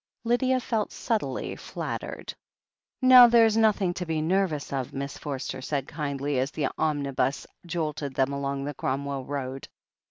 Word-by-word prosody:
Lydia 255 +2 +2
felt 225 -4 -1
subtly 210 - -2
flattered. - - -6 0.7
"Now 255 -1 +10
there's 230 -2 +5
nothing 210 -5 +3
to 180 - -4
be 160 -1 0
nervous 165 -2 0
of/' 135 -3 -3
Miss 140 0 -4
For 145 -3 -4
ster 130 0 -5
said 140 0 -2
kindly, 140 -2 -2
as 130 +2 0
the 145 -2 -1
omnibus 140 -3 0 0.2
jolted 155 -5 -3
them 135 +1 +1
along 140 0 -2
the 145 - -3
Cromwell 135 0 -3
Road. 135 -2 -5
145 Hz, 150 wpm, -27 LUFS, 135-195 Hz, 0.7 s, Now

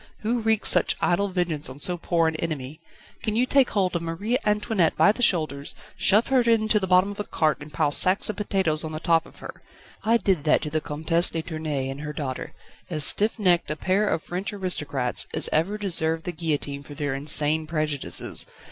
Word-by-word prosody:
who 235 +2 -1
wreaks 220 -1 +2
such - - +4
idle 195 +3 +1
vengeance 175 -7 -2
on 130 - -10
so 175 +5 0
poor 170 -1 0
an 160 - -2
enemy? 155 -3 -5 0.4
Can 215 -2 -2
you 245 +3 +2
take 270 0 +3
hold 185 -4 -1
of 170 - -1
Marie 170 +8 -3
Antoinette 210 -4 0
by 205 - +5
the 235 - -7
shoulders, 155 -9 -1 0.2
shove 210 +4 +2
her 265 -1 +3
into 225 -2 +2
the 190 - -3
bottom 185 +2 +3
of 205 - -10
a - - -1
cart 155 -6 -1
and 150 +1 -10
pile 150 -2 0
sacks 185 +6 +6
of 215 - -2
potatoes 190 -7 -1
on 155 0 -6
the 155 - -4
top 165 -1 +1
of - - -19
her? - - -10 0.4
I 230 +2 +3
did 190 -9 0
that 155 - +2
to 150 - -5
the 155 0 -1
Comtesse 165 +3 0
de 165 -1 -4
Tournai 155 -5 -4
and 135 +2 -6
her 150 0 -6
daughter, 135 -3 -6 0.3
as 155 -4 +1
stiff 210 - +3
necked 180 -5 +2
a 155 - -2
pair 190 +6 0
of 160 - -2
French 180 +3 -5
aristocrats 150 -10 -1
as - - +5
ever 180 +7 0
deserved 165 -5 0
the 175 - -2
guillotine 145 -4 -3
for 145 +1 -12
their 145 -1 -3
insane 150 +2 +3
prejudices. 155 -3 -3
165 Hz, 210 wpm, -24 LUFS, 150-200 Hz, 0.4 s, sacks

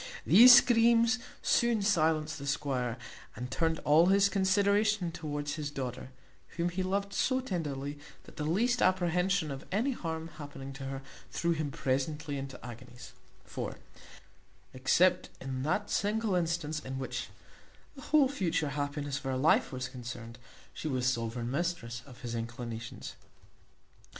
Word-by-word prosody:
These 245 +5 +10
screams 235 0 +5 0.2
soon 235 -3 +2
silenced 155 -5 +1
the 140 - -6
squire, 130 -4 -1 0.4
and 125 +2 -6
turned 160 +3 +1
all 155 +4 +5
his 200 +1 +5
consideration 200 0 +2
towards 145 -2 -4
his 150 -1 -3
daughter, 130 -3 -5 0.5
whom 170 +1 +1
he 180 +2 -3
loved 200 +2 -1
so 260 0 +1
tenderly, 145 - -4 0.2
that - - -15
the 150 - -2
least 235 +11 +1
apprehension 180 -2 +2
of 135 0 -6
any 225 +8 +1
harm 165 -7 -4
happening 135 -2 -8
to 135 0 -7
her, 135 0 -5 0.3
threw 170 0 -1
him 155 -3 -1
presently 140 +2 -2
into 135 -1 -7
agonies; 120 +1 -11 0.3
for, - - -5 1.0
except 175 +8 +3
in 130 -1 -4
that 195 +9 -1
single 215 0 0
instance 165 -3 -1
in 130 -2 -6
which 130 - -4 0.7
the 275 - -11
whole 295 0 +4
future 175 - -1
happiness 145 0 -3
of - - -17
her 130 -1 -1
life 145 +5 +3
was 130 -1 -4
concerned, 120 -2 -8 0.3
she - - -5
was 130 -4 -1
sovereign 120 0 -1
mistress 140 -7 -2
of 125 -2 -14
his 120 -1 -5
inclinations. 115 0 -6
155 Hz, 145 wpm, -31 LUFS, 130-190 Hz, 1.0 s, These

